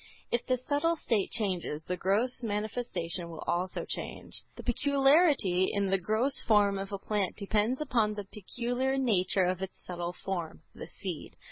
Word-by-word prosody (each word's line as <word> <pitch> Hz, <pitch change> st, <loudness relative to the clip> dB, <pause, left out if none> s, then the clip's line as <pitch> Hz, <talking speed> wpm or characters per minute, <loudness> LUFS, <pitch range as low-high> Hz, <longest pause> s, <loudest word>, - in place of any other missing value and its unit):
If 240 Hz, -, +1 dB
the 255 Hz, -1 st, +2 dB
subtle 290 Hz, +6 st, +1 dB
state 225 Hz, -10 st, 0 dB
changes, 180 Hz, -8 st, -1 dB
the 180 Hz, -, -2 dB
gross 210 Hz, +8 st, +1 dB
manifestation 205 Hz, -6 st, -1 dB
will 165 Hz, -2 st, -7 dB
also 180 Hz, +2 st, -1 dB
change. -, -, -5 dB
The -, -, -9 dB
peculiarity 275 Hz, -, +4 dB
in 200 Hz, -1 st, 0 dB
the 195 Hz, -, +3 dB
gross 220 Hz, +9 st, +2 dB
form 205 Hz, -3 st, +4 dB
of 195 Hz, +1 st, -5 dB
a 200 Hz, -, -2 dB
plant 200 Hz, -1 st, -1 dB
depends 215 Hz, +4 st, +1 dB
upon 230 Hz, -7 st, +1 dB
the 205 Hz, -, -4 dB
peculiar 245 Hz, +7 st, -2 dB
nature 195 Hz, -7 st, +2 dB
of 180 Hz, 0 st, -1 dB
its 190 Hz, 0 st, -5 dB
subtle 175 Hz, -1 st, -4 dB
form, 175 Hz, -, -3 dB
the -, -, -8 dB
seed. -, -, -6 dB
210 Hz, 160 wpm, -30 LUFS, 185-245 Hz, -, peculiarity